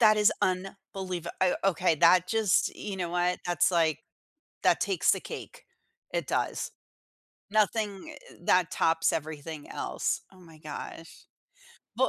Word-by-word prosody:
That 215 -2 +6
is 210 -1 +5
unbelieva 185 -1 -3
o 185 -1 +4
okay, 180 -3 +3
that 175 +3 +6
just 220 -3 +2
you 200 -2 -5
know 175 -2 -3
what, 180 +1 +1
that's 175 +1 +3
like 160 -4 +2 0.6
that - - +4
takes 385 - +2
the - - -1
cake, - - -9 0.5
it - - -1
does. - - -1 0.8
Nothing 215 +5 0 0.2
er, - - -15
that 180 -1 +3
tops 165 0 +2
everything 155 -1 -5
else. - - -2
Oh, 185 - -17
my 165 -3 -15
gosh. 155 +2 -9 0.7
Bu 260 +2 +3
180 Hz, 140 wpm, -29 LUFS, 165-195 Hz, 0.8 s, That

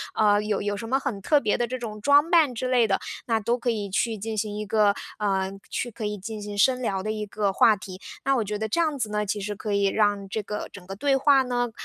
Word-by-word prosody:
呃， 205 -1 +4
有 210 -1 -1
有 205 0 -1
什 225 +2 -6
么 270 +2 +2
很 245 -8 -4
特 295 +8 +3
别 210 - 0
的 240 - 0
这 255 - -4
种 215 -3 -7
装 285 +5 +5
扮 315 -7 +5
之 255 +3 -2
类 240 -3 +4
的， 195 - +1 0.3
那 225 -2 +2
都 235 +3 0
可 240 0 -2
以 210 -3 -2
去 220 +3 0
进 215 +2 -4
行 210 0 -2
一 215 - -4
个， 210 -1 +3 0.2
呃， 195 -2 0 0.2
去 240 - -3
可 215 0 -6
以 210 0 -2
进 215 +2 -6
行 205 0 -6
深 255 +3 +3
聊 195 -5 -1
的 215 - -2
一 215 -1 -3
个 205 -1 -1
话 215 +2 +5
题， 190 -1 -10 0.2
那 275 0 +3
我 225 - +1
觉 210 +1 -3
得 220 +1 -2
这 335 +11 +1
样 305 -3 0
子 220 -4 -2
呢， 210 0 0
其 210 +1 -2
实 205 +1 -4
可 210 +1 -4
以 200 0 +2
让 205 -1 +1
这 220 - -2
个 210 +1 -5
整 185 -3 -12
个 195 +1 -7
对 275 +5 +2
话 275 -1 +5
呢， 245 -1 -1
215 Hz, 295 characters per minute, -25 LUFS, 205-245 Hz, 0.3 s, 装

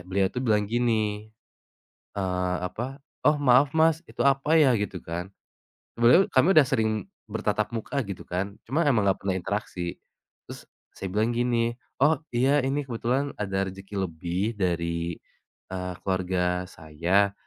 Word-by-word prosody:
Beliau 95 0 +2
tuh 125 - -3
bilang 105 -3 +3
gini, 110 -3 0 0.9
eee, 90 -2 -1
apa, 120 +9 -5 0.3
"Oh 150 - +5
maaf 135 +1 +5
Mas, 160 0 +4
itu - - -17
apa 140 +4 +3
ya?" 135 -5 +5
Gitu 100 -3 -3
kan, 85 +2 -4 0.7
sebenernya 125 +11 +6
kami 155 +9 +5
udah 150 - +8
sering 110 -2 0 0.2
bertatap 105 0 -1
muka 135 +5 -2
gitu 100 -2 -6
kan, 95 +3 -3
cuma 155 +5 +1
emang 110 -7 +2
gak 95 - +1
pernah 95 - +1
interaksi, 90 -2 -4 0.5
terus - - -9 0.3
saya 95 - -4
bilang 110 +2 +2
gini, 120 -1 +1 0.3
"oh 150 +1 +5 0.2
iya, 135 +4 +3
ini 135 +2 -1
kebetulan 130 +3 -1
ada 95 -1 -1
rezeki 95 +2 -10
lebih 90 +7 -2
dari," 85 -2 -1 0.6
eee, 90 -1 -3
"keluarga 90 -1 0
saya 90 +6 0
105 Hz, 145 wpm, -26 LUFS, 95-125 Hz, 0.9 s, udah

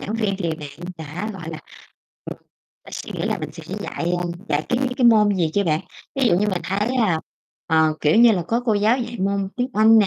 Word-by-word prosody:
giảng 210 - -4
viên 210 -4 0
thì 170 -4 -1
bạn 140 -1 -9 0.2
đã 165 +8 -5
gọi 165 -4 -8
là, 160 - -6 0.7
ừm, - - -7 0.5
bạn - - -13
suy - - -6
nghĩ - - -4
là - - -1
mình - - -6
sẽ - - -10 0.2
dạy, 170 +1 -3
a, 175 - -2 0.2
dạy, 145 +1 +1
cái 245 - +1 0.2
cái, 250 -3 +4
môn 210 -3 +5
gì 165 -3 +1
chưa 200 -1 +2
bạn? 155 -1 +1 0.3
Ví 270 -2 +1
dụ - - +4
như 210 +1 +1
mình 185 -3 -1
thấy 205 +4 0
là, 180 -9 +2 0.5
ờ, 160 -1 +3
kiểu 150 +6 +3
như 235 0 +7
là, 180 -4 0
có 235 +2 +1
cô 220 - +3
giáo 215 +5 +3
dạy 240 -1 -4
môn 195 0 0
tiếng 250 0 0
Anh 220 +1 +6
nè 205 - +5
200 Hz, 245 wpm, -22 LUFS, 165-220 Hz, 0.7 s, như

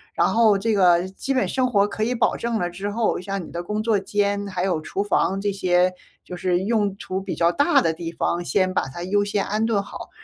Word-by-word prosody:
然 - - +3
后 225 -3 +4
这 220 +3 0
个 180 -3 +4
基 195 +8 -4
本 255 - +1
生 260 -1 +1
活 205 -4 +2
可 215 - -3
以 240 +3 0
保 235 - +1
证 235 -1 -2
了 175 - -1
之 190 +4 -5
后， 215 -3 0
像 195 -2 -4
你 - - -12
的 170 +1 -4
工 210 +4 -2
作 220 -1 +2
间， 200 +1 -1
还 185 -2 -3
有 175 -5 0
厨 170 +5 -3
房， 195 -1 +1
这 205 +1 -1
些 185 -1 +2 0.3
就 180 - -7
是 175 0 0
用 205 -3 0
处 190 -1 -4
比 195 - -4
较 170 0 +3
大 290 +5 +4
的 165 -1 +1
地 165 0 -6
方， 175 +1 -1
先 185 +1 +1
把 - - +2
它 155 +6 -8
优 205 +3 +1
先 205 0 -1
安 215 +2 0
顿 220 -3 +1
好。 200 - -9
200 Hz, 265 characters per minute, -23 LUFS, 180-215 Hz, 0.3 s, 后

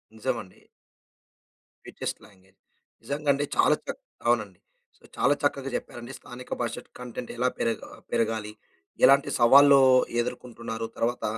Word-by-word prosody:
నిజమండి. 115 -4 -5 1.2
Sweetest - - -6
language. 95 -2 -23 0.4
నిజంగా 145 +1 -3
అండి 145 +1 -1
చాలా - - +5
చక్ - - -6 0.3
అవును 120 -1 +4
అండి. 95 -3 -22 0.4
సో, - - -32
చాలా 140 - +4
చక్కగా 140 -1 0
చెప్పారండి. 120 +1 -6
స్థానిక 125 +1 -11
భాష 120 - -2
ట్ - - -30
కంటెంట్ 125 0 -7
ఎలా 125 +1 +2
పెరగా 115 -1 -2 0.2
పెరగాలి. 110 -1 -1 0.5
ఎలాంటి 140 +1 +5
సవాళ్లూ 140 +3 +7 0.4
ఎదుర్కొంటున్నారు, 115 -2 -5
తర్వాత 120 +1 -1
120 Hz, 125 wpm, -26 LUFS, 115-135 Hz, 1.2 s, సవాళ్లూ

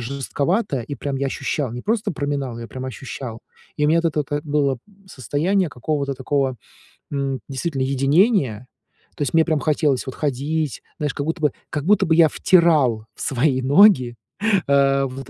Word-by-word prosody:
жестковатая, 140 - -1
и 145 - -6
прям 140 +3 -3
я 140 +1 -1
ощущал, 135 0 -2
не 125 +1 -6
просто 220 -4 -1
проминал, 140 -5 -3
я 115 - -7
прям 130 +2 -7
ощущал, 125 -2 -7 0.4
и 150 - +1
у - - +2
меня 165 +2 +4
вот 170 - +1
это 155 -1 -1
вот, 145 - -6
э, 145 - 0
было 145 -3 0 0.3
состояние 170 - 0
какого-то 140 +1 -2
такого, 135 -1 -1 0.6
м, 135 -2 -2
действительно 135 +1 -3
единения, 135 - +2 0.5
то - - -1
есть 140 - -3
мне 160 0 +5
прям 155 -3 +1
хотелось 145 -3 +1
вот 130 - -5
ходить, 150 +1 -2 0.2
знаешь, 150 -2 -1
как 140 - -4
будто 160 +1 -3
бы 150 -2 +3 0.2
как 150 - -3
будто 205 +3 +4
бы 160 - +2
я 165 -1 +6
втирал 145 -12 +3
в - - -11
свои 130 0 +1
ноги, 135 - +5 0.5
э, 140 -1 +3
вот 130 0 -7
140 Hz, 180 wpm, -21 LUFS, 130-155 Hz, 0.6 s, я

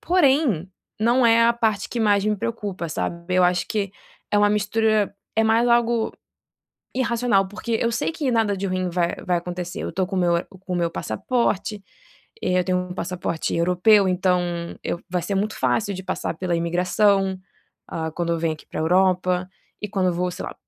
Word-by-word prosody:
porém 275 - +2 0.3
não 240 +3 +3
é 230 0 +5
a 235 - +5
parte 220 -3 0
que 240 - -4
mais 205 -2 +3
me 210 -1 +1
preocupa 200 -5 -4
sabe, 170 +3 -3
eu 185 - +4
acho 180 0 +2
que 200 -3 -1 0.4
é 210 - +2
uma 205 0 +4
mistura, 210 0 +1 0.2
é 220 - +4
mais 225 +2 +3
algo 235 -1 +2 0.8
irracional, 235 -6 +1
porque 225 +3 -3
eu 235 - +1
sei 235 - -1
que 290 -5 -1
nada 220 -3 +2
de 195 +1 -3
ruim 185 -1 -1
vai 170 0 0
vai 180 -1 +2
acontecer, 175 0 -5
eu - - -3
estou 185 -1 -1
com 195 - -6
o - - +2
meu 170 -1 +2 0.2
com 185 -1 -5
o - - 0
meu 170 -1 0
passaporte, 210 - -1 0.6
eh, 180 0 +2
eu - - -1
tenho 185 -1 +1
um - - -5
passaporte 175 -2 -3
europeu, 180 +4 +4
então 180 0 +2 0.4
eu 170 - -2
vai 180 -2 -1
ser 200 - -2
muito 210 +2 -1
fácil 195 - 0
de 190 - -6
passar - - -3
pela 180 -1 -1
imigração, 190 +3 +2 0.5
ah, 160 -1 -3
quando 170 0 -1
eu 165 - 0
venho 165 -1 0
aqui - - -16
para - - -4
Europa, 180 +1 +2 0.3
e 210 - -3
quando 190 -2 +1
eu - - +1
vou, 180 +1 -1
sei - - -7
lá, - - -7
190 Hz, 195 wpm, -23 LUFS, 180-220 Hz, 0.8 s, é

